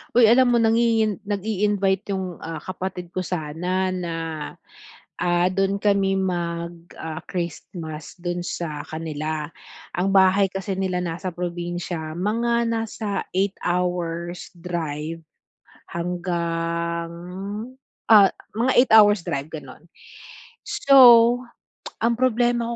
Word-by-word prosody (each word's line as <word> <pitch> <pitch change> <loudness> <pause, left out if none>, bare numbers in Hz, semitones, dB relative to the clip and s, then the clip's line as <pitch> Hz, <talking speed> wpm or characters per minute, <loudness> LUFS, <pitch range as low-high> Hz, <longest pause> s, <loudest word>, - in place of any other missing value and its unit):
Uy, 240 -2 +7
alam 245 +2 +5
mo 240 - +4
nangingin 225 -2 +2
nagi-invite 205 -1 0
yung, 190 -2 -3
ah, 160 -1 -5
kapatid 180 0 -6
ko 185 - -1
sana 180 +3 -2
na, 175 -2 -3 1.0
ah, 175 0 +2
dun 195 +1 0
kami 200 -2 +2
mag, 175 -3 -2 0.2
ah, 160 -1 -6
Christmas 165 -2 -6
dun 175 0 -3
sa 155 -5 -4
kanila. 155 -1 -4 0.5
Ang 190 +2 +1
bahay 190 0 +4
kasi 195 0 -3
nila 185 -1 -1
nasa 175 +1 -4
probinsiya. 175 -2 -4
Mga 235 +3 +1
nasa 225 -3 -2
8 195 +2 0
hours 175 -1 -2
drive 165 -2 -5 0.7
hanggang, 170 -1 -2 1.0
ah, 205 -3 +7 0.2
mga 245 +3 +2
8 255 - +3
hours 205 -2 +7
drive 140 -1 -4
gano'n. 150 -1 -9 0.8
So, 275 0 +3 1.1
ang 230 +1 +2
problema 240 -1 +1
180 Hz, 110 wpm, -23 LUFS, 170-205 Hz, 1.1 s, Uy